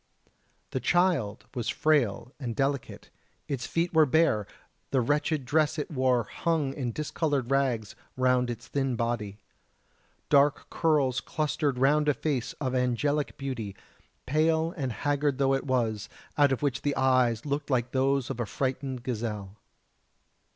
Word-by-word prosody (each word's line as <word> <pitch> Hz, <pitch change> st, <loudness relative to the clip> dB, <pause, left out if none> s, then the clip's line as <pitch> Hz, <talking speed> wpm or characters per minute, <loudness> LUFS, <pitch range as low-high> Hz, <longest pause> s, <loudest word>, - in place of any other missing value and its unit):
The 130 Hz, -, -1 dB
child 145 Hz, -, +1 dB
was 120 Hz, -3 st, -2 dB
frail 125 Hz, -5 st, +1 dB
and 120 Hz, -5 st, -4 dB
delicate: 140 Hz, -1 st, -2 dB, 0.4 s
its 135 Hz, -3 st, -3 dB
feet 170 Hz, +1 st, -1 dB
were 160 Hz, -2 st, +5 dB
bare, 130 Hz, -9 st, +2 dB, 0.4 s
the 135 Hz, -, +2 dB
wretched 145 Hz, +2 st, 0 dB
dress 155 Hz, +3 st, +2 dB
it 150 Hz, -, -3 dB
wore 130 Hz, -4 st, +2 dB
hung 150 Hz, +2 st, -1 dB
in 125 Hz, -4 st, -3 dB
discoloured 145 Hz, -2 st, -1 dB
rags 125 Hz, -6 st, 0 dB, 0.2 s
round 125 Hz, -1 st, +2 dB
its 120 Hz, -1 st, -6 dB
thin 135 Hz, -3 st, -1 dB
body. 115 Hz, -4 st, -2 dB, 0.9 s
Dark 145 Hz, 0 st, +3 dB
curls 145 Hz, -6 st, +2 dB
clustered 150 Hz, -3 st, -1 dB
round 150 Hz, +3 st, +3 dB
a 145 Hz, -, +2 dB
face 140 Hz, -7 st, -2 dB
of 130 Hz, -3 st, -3 dB
angelic 130 Hz, +4 st, 0 dB
beauty, 120 Hz, -8 st, -4 dB, 0.5 s
pale 160 Hz, +4 st, +2 dB
and 135 Hz, -7 st, -2 dB
haggard 145 Hz, +2 st, 0 dB
though 135 Hz, -1 st, +2 dB
it 135 Hz, +1 st, -1 dB
was, 115 Hz, -5 st, 0 dB, 0.3 s
out 145 Hz, -2 st, +4 dB
of 135 Hz, -, -1 dB
which 135 Hz, -2 st, 0 dB
the 145 Hz, -1 st, 0 dB
eyes 130 Hz, -3 st, +2 dB
looked 145 Hz, 0 st, -2 dB
like 125 Hz, -2 st, 0 dB
those 135 Hz, 0 st, +1 dB
of -, -, -6 dB
a 120 Hz, -, -1 dB
frightened 130 Hz, -1 st, -3 dB
gazelle. 105 Hz, -5 st, -4 dB
135 Hz, 145 wpm, -28 LUFS, 120-145 Hz, 0.9 s, were